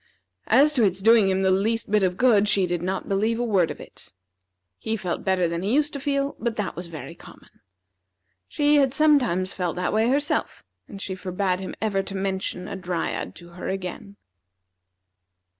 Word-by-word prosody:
As 280 Hz, +7 st, +5 dB
to 250 Hz, -5 st, +2 dB
its 190 Hz, -2 st, +1 dB
doing 220 Hz, -1 st, +5 dB
him 190 Hz, 0 st, +1 dB
the 190 Hz, -, +3 dB
least 210 Hz, +3 st, 0 dB
bit 210 Hz, -1 st, +4 dB
of 185 Hz, -1 st, 0 dB
good, 220 Hz, -5 st, +4 dB
she 200 Hz, -2 st, +3 dB
did 175 Hz, -1 st, -2 dB
not 190 Hz, +2 st, -3 dB
believe 215 Hz, +4 st, 0 dB
a 240 Hz, -, -1 dB
word 195 Hz, -8 st, +2 dB
of -, -, -7 dB
it. -, -, -13 dB, 0.7 s
He 220 Hz, 0 st, -2 dB
felt 180 Hz, -4 st, -4 dB
better 185 Hz, -2 st, +1 dB
than 170 Hz, 0 st, -3 dB
he 205 Hz, +7 st, 0 dB
used 295 Hz, 0 st, +1 dB
to 280 Hz, -, -4 dB
feel, 280 Hz, 0 st, -1 dB
but 235 Hz, -1 st, -2 dB
that 210 Hz, -3 st, -3 dB
was 175 Hz, 0 st, -6 dB
very 160 Hz, -3 st, -8 dB
common. -, -, -17 dB, 0.9 s
She 295 Hz, 0 st, +3 dB
had 275 Hz, -2 st, +2 dB
sometimes 250 Hz, -, +3 dB
felt 180 Hz, -3 st, -2 dB
that 180 Hz, 0 st, -1 dB
way 220 Hz, +2 st, +2 dB
herself, 285 Hz, +2 st, -1 dB, 0.2 s
and 200 Hz, -, -10 dB
she 195 Hz, -, -4 dB
forbade 185 Hz, 0 st, -2 dB
him 190 Hz, -, -6 dB
ever 200 Hz, -3 st, +1 dB
to 195 Hz, 0 st, -6 dB
mention 190 Hz, -1 st, -3 dB
a 205 Hz, -, -5 dB
Dryad 180 Hz, -3 st, -3 dB
to 175 Hz, 0 st, -13 dB
her 175 Hz, +1 st, -7 dB
again. 190 Hz, +1 st, -5 dB
195 Hz, 190 wpm, -24 LUFS, 185-230 Hz, 0.9 s, As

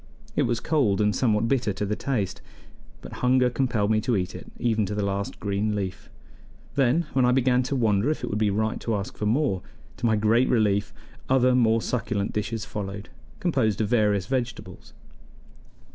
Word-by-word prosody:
It -, -, +2 dB
was 120 Hz, -, 0 dB
cold 135 Hz, -12 st, +1 dB
and 105 Hz, -1 st, +2 dB
somewhat 110 Hz, -3 st, +2 dB
bitter 120 Hz, -5 st, +1 dB
to 105 Hz, -, -3 dB
the 105 Hz, +1 st, -1 dB
taste, 110 Hz, -9 st, -2 dB, 0.6 s
but -, -, -9 dB
hunger 125 Hz, 0 st, +3 dB
compelled 115 Hz, -4 st, 0 dB
me 110 Hz, 0 st, +2 dB
to 120 Hz, -1 st, +1 dB
eat 90 Hz, -1 st, -2 dB
it -, -, -10 dB
even 115 Hz, -3 st, +1 dB
to 105 Hz, -, -3 dB
the 105 Hz, -1 st, -1 dB
last 100 Hz, 0 st, -3 dB
green 105 Hz, +1 st, -1 dB
leaf; 95 Hz, -3 st, -5 dB, 0.6 s
then, 140 Hz, +5 st, +2 dB
when 130 Hz, -, +3 dB
I 125 Hz, -, +4 dB
began 125 Hz, -1 st, +3 dB
to 130 Hz, +2 st, -2 dB
wonder 110 Hz, -1 st, +2 dB
if 155 Hz, -, -2 dB
it -, -, -3 dB
would 105 Hz, -, -1 dB
be 110 Hz, -1 st, +2 dB
right 110 Hz, +3 st, -1 dB
to 115 Hz, -, -1 dB
ask 100 Hz, -1 st, -4 dB
for 105 Hz, -, -2 dB
more, 115 Hz, -5 st, +1 dB, 0.4 s
to 120 Hz, -, 0 dB
my 110 Hz, -, +3 dB
great 110 Hz, +4 st, +3 dB
relief 105 Hz, -4 st, +2 dB, 0.4 s
other 130 Hz, -1 st, +4 dB
more 115 Hz, -2 st, +3 dB
succulent 110 Hz, -4 st, -2 dB
dishes 105 Hz, +1 st, -3 dB
followed, 100 Hz, 0 st, -6 dB, 0.3 s
composed 110 Hz, -, +1 dB
of 105 Hz, -2 st, 0 dB
various 105 Hz, -5 st, +2 dB
vegetables. 120 Hz, -6 st, -4 dB
110 Hz, 190 wpm, -25 LUFS, 105-125 Hz, 0.6 s, I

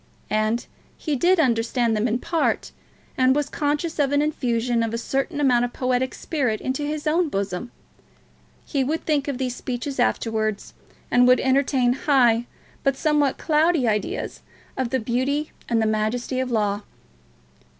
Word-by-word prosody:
And 215 Hz, +2 st, +1 dB, 0.3 s
he 305 Hz, -3 st, -2 dB
did 355 Hz, +7 st, +3 dB
understand 235 Hz, -3 st, +2 dB
them 215 Hz, +3 st, +1 dB
in 235 Hz, +1 st, 0 dB
part, 330 Hz, +6 st, -1 dB, 0.5 s
and 260 Hz, +1 st, +4 dB
was 295 Hz, -1 st, 0 dB
conscious 300 Hz, +2 st, -2 dB
of 280 Hz, -1 st, +2 dB
an 285 Hz, -, +3 dB
infusion 245 Hz, -5 st, 0 dB
of 230 Hz, 0 st, -1 dB
a -, -, -1 dB
certain 275 Hz, +6 st, -2 dB
amount 250 Hz, -4 st, +3 dB
of 245 Hz, -, -2 dB
poetic 255 Hz, 0 st, 0 dB
spirit 255 Hz, -9 st, -1 dB
into 260 Hz, +2 st, -2 dB
his 295 Hz, +1 st, -3 dB
own 320 Hz, +2 st, +2 dB
bosom. 195 Hz, 0 st, -3 dB, 1.0 s
He 275 Hz, -3 st, 0 dB
would 310 Hz, +5 st, -2 dB
think 295 Hz, -3 st, +1 dB
of 280 Hz, -3 st, -2 dB
these 250 Hz, -2 st, -2 dB
speeches 260 Hz, +2 st, -4 dB
afterwards, 220 Hz, -3 st, -1 dB, 0.4 s
and 245 Hz, 0 st, +5 dB
would 250 Hz, 0 st, +6 dB
entertain 260 Hz, -2 st, +2 dB
high 245 Hz, -4 st, +3 dB, 0.4 s
but 275 Hz, -1 st, +1 dB
somewhat 295 Hz, -3 st, +2 dB
cloudy 315 Hz, -3 st, +2 dB
ideas 210 Hz, -2 st, -2 dB, 0.3 s
of 260 Hz, -2 st, -1 dB
the 260 Hz, -, 0 dB
beauty 260 Hz, +6 st, -1 dB, 0.2 s
and 230 Hz, -2 st, +2 dB
the 220 Hz, -, +2 dB
majesty 220 Hz, +4 st, -1 dB
of 260 Hz, -1 st, -1 dB
Law. 210 Hz, -3 st, 0 dB
255 Hz, 160 wpm, -23 LUFS, 235-290 Hz, 1.0 s, would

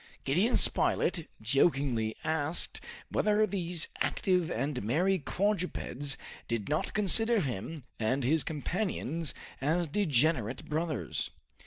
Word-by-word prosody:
Gideon 180 Hz, -, +2 dB
Spilett 165 Hz, -4 st, +2 dB, 0.2 s
jokingly 125 Hz, -3 st, +1 dB
asked 160 Hz, +1 st, 0 dB, 0.3 s
whether 210 Hz, 0 st, +2 dB
these 180 Hz, -4 st, 0 dB
active 180 Hz, -3 st, +1 dB
and 135 Hz, +3 st, -2 dB
merry 175 Hz, -, +1 dB
quadrupeds 170 Hz, -7 st, -2 dB, 0.3 s
did 115 Hz, -3 st, -2 dB
not 150 Hz, +1 st, -1 dB
consider 225 Hz, +3 st, +6 dB
him 140 Hz, -, -4 dB, 0.2 s
and 130 Hz, +5 st, 0 dB
his 150 Hz, +5 st, +3 dB
companions 165 Hz, -, -2 dB, 0.3 s
as 165 Hz, +5 st, +1 dB
degenerate 145 Hz, -, +1 dB
brothers. 155 Hz, -3 st, -2 dB
155 Hz, 105 wpm, -30 LUFS, 135-180 Hz, 0.3 s, consider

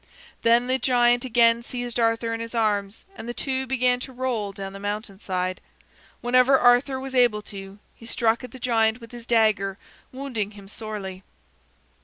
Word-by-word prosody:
Then 235 Hz, +1 st, +4 dB
the 260 Hz, +1 st, +1 dB
giant 245 Hz, -1 st, +3 dB
again 235 Hz, -1 st, +4 dB
seized 245 Hz, 0 st, -4 dB
Arthur 230 Hz, 0 st, +1 dB
in 225 Hz, -, -3 dB
his 230 Hz, +1 st, -6 dB
arms, 205 Hz, -2 st, 0 dB
and 235 Hz, -, -8 dB
the 240 Hz, -, -4 dB
two 265 Hz, -1 st, -2 dB
began 250 Hz, -1 st, +2 dB
to 260 Hz, -, -7 dB
roll 245 Hz, -5 st, -2 dB
down 195 Hz, -1 st, -7 dB
the 195 Hz, -, -8 dB
mountain 205 Hz, -1 st, -4 dB
side. 185 Hz, -2 st, -3 dB, 0.6 s
Whenever 255 Hz, +2 st, +5 dB
Arthur 250 Hz, +2 st, +4 dB
was 265 Hz, 0 st, -7 dB
able 240 Hz, -5 st, +3 dB
to, 195 Hz, -1 st, -9 dB, 0.2 s
he 230 Hz, -, -14 dB
struck 230 Hz, +1 st, +1 dB
at 250 Hz, -, -7 dB
the 260 Hz, -, -11 dB
giant 225 Hz, -2 st, +2 dB
with 230 Hz, -2 st, -13 dB
his 240 Hz, -1 st, -10 dB
dagger, 210 Hz, -4 st, +2 dB, 0.3 s
wounding 250 Hz, -6 st, -4 dB
him 200 Hz, -1 st, -12 dB
sorely. 200 Hz, -3 st, -6 dB
230 Hz, 175 wpm, -24 LUFS, 210-250 Hz, 0.6 s, Whenever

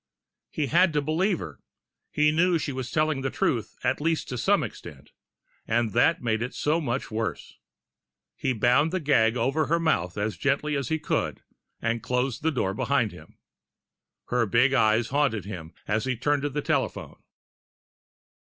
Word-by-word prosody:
He 150 Hz, -, -2 dB
had 170 Hz, +3 st, +3 dB
to 150 Hz, -, +2 dB
believe 175 Hz, +6 st, +1 dB
her 80 Hz, -, -8 dB, 0.5 s
he 150 Hz, 0 st, +3 dB
knew 170 Hz, +2 st, +3 dB
she 150 Hz, -, -3 dB
was 130 Hz, -2 st, -5 dB
telling 155 Hz, -1 st, +1 dB
the 135 Hz, -, -1 dB
truth, 115 Hz, -4 st, -1 dB
at -, -, 0 dB
least 165 Hz, +1 st, 0 dB
to 125 Hz, -, -4 dB
some -, -, +3 dB
extent. -, -, -9 dB, 0.6 s
And 115 Hz, -1 st, +1 dB
that 125 Hz, +7 st, +2 dB
made 110 Hz, -2 st, 0 dB
it 125 Hz, -, 0 dB
just -, -, -7 dB
so 155 Hz, +3 st, +2 dB
much 125 Hz, -4 st, -3 dB
worse. 110 Hz, +1 st, -4 dB, 0.8 s
He 130 Hz, -, -1 dB
bound 125 Hz, +7 st, +3 dB
the 185 Hz, -, 0 dB
gag 125 Hz, -7 st, +3 dB
over 140 Hz, +4 st, +1 dB
her 170 Hz, +2 st, +2 dB
mouth 90 Hz, -, 0 dB
as 105 Hz, +1 st, -2 dB
gently 145 Hz, +2 st, 0 dB
as 140 Hz, -3 st, -2 dB
he 160 Hz, -, +1 dB
could, 160 Hz, -, -2 dB, 0.4 s
and 115 Hz, 0 st, 0 dB
closed 125 Hz, +2 st, -1 dB
the 160 Hz, -, +2 dB
door 110 Hz, -10 st, -1 dB
behind 120 Hz, 0 st, +1 dB
him. -, -, -15 dB, 0.9 s
Her 120 Hz, -2 st, +1 dB
big 120 Hz, +6 st, +3 dB
eyes 110 Hz, -2 st, +3 dB
haunted 135 Hz, -8 st, +1 dB
him 90 Hz, -6 st, -7 dB, 0.2 s
as 110 Hz, +2 st, 0 dB
he 130 Hz, -2 st, -1 dB
turned 145 Hz, +4 st, +1 dB
to 145 Hz, -, -1 dB
the 145 Hz, +1 st, -3 dB
telephone. -, -, -2 dB
130 Hz, 175 wpm, -26 LUFS, 115-150 Hz, 0.9 s, had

